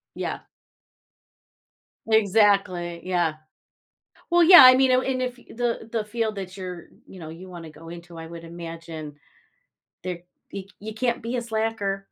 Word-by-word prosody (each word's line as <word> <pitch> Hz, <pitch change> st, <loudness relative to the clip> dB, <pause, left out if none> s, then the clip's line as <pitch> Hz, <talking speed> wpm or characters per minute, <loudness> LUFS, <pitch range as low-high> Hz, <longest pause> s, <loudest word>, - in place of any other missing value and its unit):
Yeah. -, -, -4 dB, 1.7 s
Exactly, 200 Hz, -5 st, +2 dB
yeah. 175 Hz, -3 st, 0 dB, 1.0 s
Well, 345 Hz, 0 st, +5 dB
yeah, 350 Hz, -3 st, +10 dB
I 255 Hz, 0 st, +10 dB
mean 265 Hz, 0 st, +4 dB
it -, -, +5 dB
w 260 Hz, +1 st, +1 dB
and 255 Hz, -, -2 dB
if 250 Hz, -1 st, -3 dB
y -, -, -18 dB
the 235 Hz, -1 st, -3 dB
the 225 Hz, -2 st, -2 dB
field 220 Hz, 0 st, -2 dB
that 190 Hz, -1 st, -7 dB
you're 180 Hz, -2 st, -7 dB, 0.2 s
you 185 Hz, -, -13 dB
know, 160 Hz, -, -8 dB
you 180 Hz, +3 st, -11 dB
wanna 170 Hz, -3 st, -9 dB
go 165 Hz, +2 st, -13 dB
into, 170 Hz, 0 st, -10 dB
I 165 Hz, -, -7 dB
would 170 Hz, 0 st, -10 dB
imagine 165 Hz, -2 st, -8 dB, 0.9 s
there 180 Hz, -2 st, -4 dB, 0.3 s
you 195 Hz, -1 st, -6 dB
you 215 Hz, +1 st, -7 dB
can't 235 Hz, +1 st, -1 dB
be 235 Hz, +2 st, -4 dB
a 245 Hz, -, -1 dB
slacker. 220 Hz, -4 st, -2 dB
195 Hz, 165 wpm, -24 LUFS, 170-230 Hz, 1.7 s, yeah